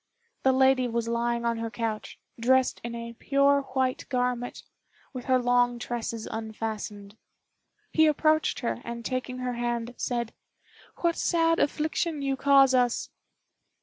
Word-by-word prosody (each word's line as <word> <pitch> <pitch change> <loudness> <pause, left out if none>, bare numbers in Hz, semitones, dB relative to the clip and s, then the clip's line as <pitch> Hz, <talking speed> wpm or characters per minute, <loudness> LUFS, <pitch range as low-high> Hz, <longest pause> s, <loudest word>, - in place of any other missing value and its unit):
The 265 - +4
lady 265 -1 +4
was 235 -1 -2
lying 235 0 -1
on 235 0 +1
her 230 0 -3
couch, 225 -2 -4 0.2
dressed 260 +2 +2
in 235 0 -5
a 235 0 -6
pure 280 +3 +3
white 260 -1 -2
garment, 250 -2 -2 0.5
with 255 -2 -6
her 260 -1 +4
long 245 -1 +2
tresses 230 -2 -4
unfastened. 220 -2 -5 0.8
He 315 0 +5
approached 310 0 +2
her, 240 -1 -2
and 235 0 -6
taking 255 0 -3
her 250 -1 -3
hand, 240 0 -2
said: 235 -2 -2 0.7
"What 340 -1 +2
sad 330 -1 +2
affliction 310 +1 0
you 275 -1 0
cause 275 -1 +5
us!" 245 -2 +1
245 Hz, 140 wpm, -27 LUFS, 235-270 Hz, 0.8 s, He